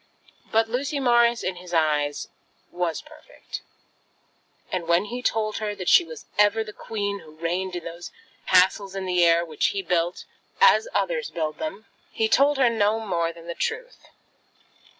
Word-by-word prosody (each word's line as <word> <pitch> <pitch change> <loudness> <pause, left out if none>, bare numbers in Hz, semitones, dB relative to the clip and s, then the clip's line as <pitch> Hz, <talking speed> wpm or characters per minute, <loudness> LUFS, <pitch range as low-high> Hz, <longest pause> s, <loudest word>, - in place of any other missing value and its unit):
But 225 0 +3
Lucy 270 +5 -2
Morris, 240 -2 +3
in 185 -1 -2
his 175 -1 -6
eyes, 150 -2 +1 0.4
was 175 -2 -2
perfect; 305 0 -11 1.1
and 175 -3 -3
when 170 +3 +3
he 245 +4 -5
told 215 -3 0
her 210 -1 -3
that 185 -3 -7
she - - +7
was 445 +6 -10
ever 210 +2 +4
the 210 -1 -10
queen 200 -2 -4
who 155 -3 -15
reigned 180 +3 -2
in 175 - -5
those 170 +1 -8 0.4
castles 190 +1 +3
in 195 -1 -3
the 180 -1 +2
air 170 0 +4
which 155 -3 0
he 195 -1 -2
built, 175 -1 -1 0.3
as 480 -1 +6
others - - 0
build 155 -2 -3
them, 310 -9 -5 0.3
he 220 -1 +1
told 280 +5 +4
her 260 -2 +4
no 220 -1 +2
more 170 -6 -1
than 165 0 -14
the 170 - -5
truth. - - -4
200 Hz, 170 wpm, -24 LUFS, 170-235 Hz, 1.1 s, she